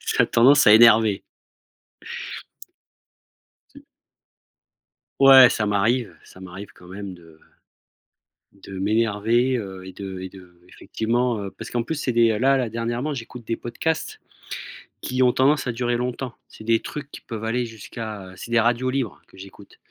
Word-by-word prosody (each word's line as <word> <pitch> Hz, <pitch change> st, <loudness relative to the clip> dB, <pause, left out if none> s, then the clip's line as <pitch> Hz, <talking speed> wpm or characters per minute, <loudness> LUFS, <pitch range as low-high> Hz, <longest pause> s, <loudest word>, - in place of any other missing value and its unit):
ça -, -, +1 dB
a -, -, -5 dB
tendance 130 Hz, +4 st, +5 dB
à 105 Hz, -, +8 dB
énerver. 110 Hz, -3 st, +6 dB, 2.5 s
Tu -, -, -13 dB, 1.4 s
Ouais, 135 Hz, -2 st, +9 dB
ça 110 Hz, -, -1 dB
m'arrive, 105 Hz, 0 st, 0 dB
ça 95 Hz, -, -16 dB
m'arrive 95 Hz, +2 st, -10 dB
quand 90 Hz, -, -17 dB
même 100 Hz, 0 st, -7 dB
de 80 Hz, -2 st, -18 dB, 1.2 s
de 95 Hz, -1 st, -8 dB
m'énerver, 115 Hz, +4 st, +1 dB
heu, 95 Hz, -4 st, -7 dB
et 95 Hz, -, -8 dB
de 95 Hz, -1 st, -7 dB
et 95 Hz, -, -6 dB
d'effectivement, 100 Hz, +6 st, -4 dB
heu 100 Hz, -, -6 dB
parce -, -, -10 dB
qu'en 120 Hz, -1 st, -1 dB
plus, 160 Hz, -, -4 dB
c'est 140 Hz, -3 st, -2 dB
des 115 Hz, -2 st, +3 dB
là, 135 Hz, +2 st, +3 dB
là, 125 Hz, -4 st, -1 dB
dernièrement 120 Hz, +6 st, -3 dB
j'écoute 120 Hz, -2 st, -9 dB
des 115 Hz, -, -2 dB
podcasts 155 Hz, +7 st, -3 dB, 0.8 s
qui 130 Hz, 0 st, 0 dB
ont 125 Hz, -, +5 dB
tendance 135 Hz, +2 st, +2 dB
à -, -, 0 dB
durer 120 Hz, +1 st, -1 dB
longtemps. 125 Hz, +1 st, -4 dB, 0.2 s
C'est 110 Hz, -, -13 dB
des 115 Hz, 0 st, +2 dB
trucs 145 Hz, -1 st, -7 dB
qui -, -, -10 dB
peuvent 110 Hz, -2 st, -7 dB
aller 120 Hz, +2 st, -1 dB
jusqu'à, 110 Hz, -3 st, -8 dB
heu -, -, -14 dB
c'est 115 Hz, -, -10 dB
des 120 Hz, -, +4 dB
radios 120 Hz, +3 st, +1 dB
libres 130 Hz, -4 st, -3 dB
que -, -, -20 dB
j'écoute. 95 Hz, +1 st, -14 dB
115 Hz, 160 wpm, -23 LUFS, 100-125 Hz, 2.5 s, Ouais